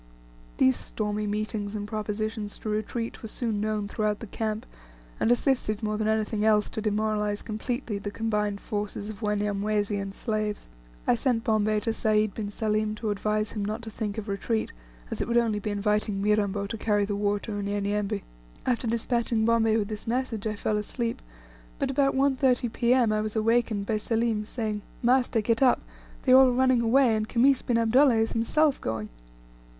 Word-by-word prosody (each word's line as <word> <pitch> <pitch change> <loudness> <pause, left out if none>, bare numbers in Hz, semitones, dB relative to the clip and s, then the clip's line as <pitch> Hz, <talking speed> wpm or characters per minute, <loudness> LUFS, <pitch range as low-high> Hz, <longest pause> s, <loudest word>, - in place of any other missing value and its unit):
These 130 0 +4
stormy 210 -1 -3
meetings 210 0 -2
and 205 -1 -4
propositions 215 0 -3
to 215 - -5
retreat 215 +2 -3
were 225 - -6
soon 220 -2 -2
known 215 -1 -1
throughout 210 0 -1
the - - -7
camp, 220 +1 -3 0.5
and - - +2
assisted 240 -3 +1
more 215 0 0
than 215 - 0
anything 220 -1 0
else 215 -1 +3
to 220 - -4
demoralize 210 -1 0
completely 225 0 -3
the 205 - -4
combined 210 -1 -1
forces 205 0 -4
of 215 - -12
Wanyamwezi 210 0 0
and 195 0 -5
slaves. 215 -2 -2 0.4
I - - +4
sent 240 -1 +1
Bombay 215 -1 +2
to 225 +1 -1
Sayd 215 -2 +2
bin 210 -2 -4
Salim 215 0 -1
to 215 0 -2
advise 215 +1 -1
him 210 - -3
not 215 +3 -3
to 220 - -7
think 210 -1 -4
of 220 0 -4
retreat, 220 +3 -1 0.4
as - - -3
it - - -2
would 235 0 +2
only 225 -3 +2
be 210 - -4
inviting 210 0 0
Mirambo 205 -1 +1
to 215 +2 -5
carry 205 -2 +2
the 205 0 -2
war 205 0 +1
to 225 - -6
Unyanyembe. 205 0 -1 0.4
After, 245 -1 0
despatching 230 -1 0
Bombay 225 -1 +3
with 210 -2 0
this 215 0 -6
message, 230 -3 -1
I 215 - -2
fell 210 +1 -1
asleep, 230 +3 -3 0.6
but - - -1
about 275 0 +2
1.30 265 -3 +2
P.M. 240 -2 +3
I 215 - +1
was 215 0 -3
awakened 220 -2 +1
by 215 +1 0
Selim 225 -1 0
saying, 215 -2 -3 0.2
"Master, 245 -2 +3
get 230 +2 +1
up, 260 -2 +5 0.4
they 255 - +2
are - - +10
all 265 -1 +7
running 255 -1 +3
away, 235 0 +4
and 215 0 -2
Khamis 260 +2 +4
bin 240 - +1
Abdullah 240 +3 +5
is 225 0 +1
himself 280 +6 +2
going." 110 -1 -3
215 Hz, 185 wpm, -27 LUFS, 210-230 Hz, 0.6 s, are